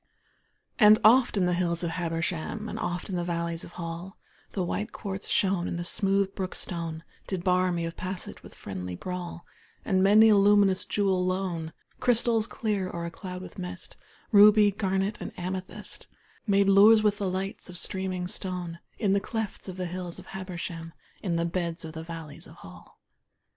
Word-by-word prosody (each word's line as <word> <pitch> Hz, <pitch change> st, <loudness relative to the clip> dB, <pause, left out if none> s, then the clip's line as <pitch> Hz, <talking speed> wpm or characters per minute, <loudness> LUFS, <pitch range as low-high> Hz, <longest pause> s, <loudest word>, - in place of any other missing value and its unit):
And 215 Hz, -1 st, +8 dB
oft 240 Hz, +1 st, +6 dB
in 185 Hz, -, +3 dB
the 180 Hz, -, +2 dB
hills 175 Hz, -1 st, 0 dB
of 170 Hz, -, -1 dB
Habersham, 170 Hz, +4 st, -3 dB
And -, -, -5 dB
oft 175 Hz, 0 st, -3 dB
in 190 Hz, -, -3 dB
the 175 Hz, -, -1 dB
valleys 170 Hz, -1 st, -2 dB
of -, -, -11 dB
Hall, 170 Hz, +2 st, -6 dB, 0.4 s
The 190 Hz, -, -1 dB
white 210 Hz, +5 st, -3 dB
quartz 195 Hz, -2 st, -5 dB
shone, 190 Hz, -3 st, +1 dB
and -, -, -3 dB
the 175 Hz, -, -3 dB
smooth 195 Hz, +1 st, +2 dB
brook 185 Hz, -1 st, -4 dB
stone 165 Hz, -2 st, -3 dB, 0.2 s
Did 185 Hz, -3 st, -3 dB
bar 185 Hz, 0 st, +3 dB
me 170 Hz, -1 st, -1 dB
of 165 Hz, 0 st, -5 dB
passage 185 Hz, 0 st, -6 dB
with -, -, -14 dB
friendly 90 Hz, -2 st, -6 dB
brawl, 175 Hz, -, -6 dB, 0.4 s
And 190 Hz, -2 st, +2 dB
many 210 Hz, +3 st, +7 dB
a 215 Hz, -, +6 dB
luminous 200 Hz, -1 st, +4 dB
jewel 195 Hz, -3 st, +1 dB
lone 180 Hz, -3 st, -2 dB, 0.3 s
Crystals 230 Hz, -2 st, +2 dB
clear 210 Hz, -7 st, -2 dB
or 170 Hz, -1 st, -4 dB
a 170 Hz, -, -5 dB
cloud 180 Hz, +1 st, -7 dB
with 190 Hz, -, -10 dB
mist, 180 Hz, -1 st, -7 dB, 0.4 s
Ruby, 210 Hz, 0 st, +7 dB
garnet 195 Hz, 0 st, -1 dB
and -, -, -7 dB
amethyst 185 Hz, +1 st, -6 dB, 0.4 s
Made 200 Hz, -1 st, +4 dB
lures 210 Hz, +3 st, +7 dB
with 210 Hz, 0 st, +2 dB
the 195 Hz, -2 st, 0 dB
lights 190 Hz, +2 st, -4 dB
of 180 Hz, -, -7 dB
streaming 185 Hz, 0 st, -2 dB
stone 180 Hz, -2 st, -4 dB, 0.2 s
In 200 Hz, -4 st, +2 dB
the 200 Hz, -, +3 dB
clefts 220 Hz, -2 st, -4 dB
of 185 Hz, -, -7 dB
the 185 Hz, -, -2 dB
hills 180 Hz, 0 st, -5 dB
of -, -, -11 dB
Habersham, 170 Hz, -3 st, -6 dB, 0.3 s
In 180 Hz, -4 st, -1 dB
the 170 Hz, 0 st, +1 dB
beds 170 Hz, -1 st, -2 dB
of 160 Hz, -, -8 dB
the 160 Hz, -, -6 dB
valleys 165 Hz, -3 st, -8 dB
of -, -, -14 dB
Hall. -, -, -14 dB
185 Hz, 185 wpm, -28 LUFS, 170-200 Hz, 0.4 s, And